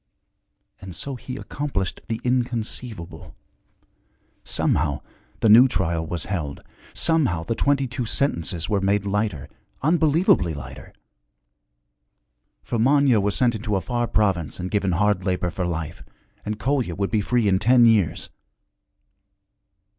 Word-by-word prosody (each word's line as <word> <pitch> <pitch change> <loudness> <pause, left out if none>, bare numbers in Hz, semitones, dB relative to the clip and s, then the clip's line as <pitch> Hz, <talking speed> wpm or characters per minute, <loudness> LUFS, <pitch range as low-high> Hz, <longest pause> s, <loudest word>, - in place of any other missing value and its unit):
And 95 -3 -9
so 140 - -4
he 130 0 -7
accomplished 135 -13 -4
the 115 -1 -3
inconceivable. 120 -8 -3 1.1
Somehow 75 -2 0 0.4
the - - +3
new 120 +5 +8
trial 85 -6 -1
was 85 -1 -4
held, 80 -8 -4 0.3
somehow 140 - +1
the 115 - -2
twenty 140 +3 +1
two 125 -1 -4
sentences 85 - -1
were 100 -2 0
made 100 +1 +1
lighter, 100 -7 -2 0.4
unbelievably 155 - +3
lighter. 65 -1 -10 1.7
For 120 - -3
Manya 135 -1 +4
was 100 0 0
sent 120 -2 +2
into 110 -1 -2
a 95 - 0
far 120 +1 -2
province 95 -9 0
and 90 0 -4
given 100 -3 0
hard 105 +1 +1
labor 90 -2 -1
for 90 +1 -3
life, 80 -1 -4 0.5
and 105 0 -2
Kolya 130 -8 -1
would 100 0 -2
be 110 -2 +2
free 120 +1 +1
in 95 -1 +3
ten 120 +3 +5
years. 105 -8 +2
105 Hz, 130 wpm, -23 LUFS, 90-125 Hz, 1.7 s, new